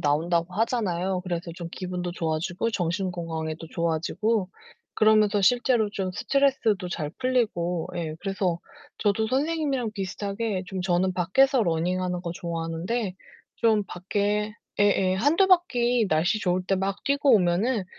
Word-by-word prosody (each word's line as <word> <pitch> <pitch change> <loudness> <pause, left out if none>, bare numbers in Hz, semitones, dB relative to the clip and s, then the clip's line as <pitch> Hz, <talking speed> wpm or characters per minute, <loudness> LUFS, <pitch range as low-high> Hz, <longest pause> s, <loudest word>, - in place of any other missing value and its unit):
나온다고 165 +4 +1
하잖아요. 190 -5 0
그래서 175 -2 -4
좀 170 -1 -6
기분도 180 -1 -4
좋아지고 170 +6 -2
정신 180 -1 -1
건강에도 165 -2 -4
좋아지고 175 +5 0 0.5
그러면서 215 -1 +4
실제로 240 +1 +3
좀 190 -2 -2
스트레스도 235 -7 +1
잘 150 -4 -3
풀리고 220 -10 0
예. 160 -2 -3
그래서 190 -3 -1 0.4
저도 210 +1 +1
선생님이랑 275 -4 0
비슷하게 200 0 -3
좀 190 -1 -4
저는 185 0 +1
밖에서 245 +9 +3
러닝하는 180 +1 -1
거 170 -2 -4
좋아하는데 170 +5 -3 0.4
좀 220 -3 +2
밖에 205 +4 -1 0.3
예예, 195 -2 +3
1-2 295 - +3
바퀴 245 - +3
날씨 175 +7 +1
좋을 180 -2 0
때 195 - +2
막 195 +1 -2
뛰고 280 -1 +3
오면은 195 +4 +2
190 Hz, 315 characters per minute, -26 LUFS, 175-225 Hz, 0.5 s, 그러면서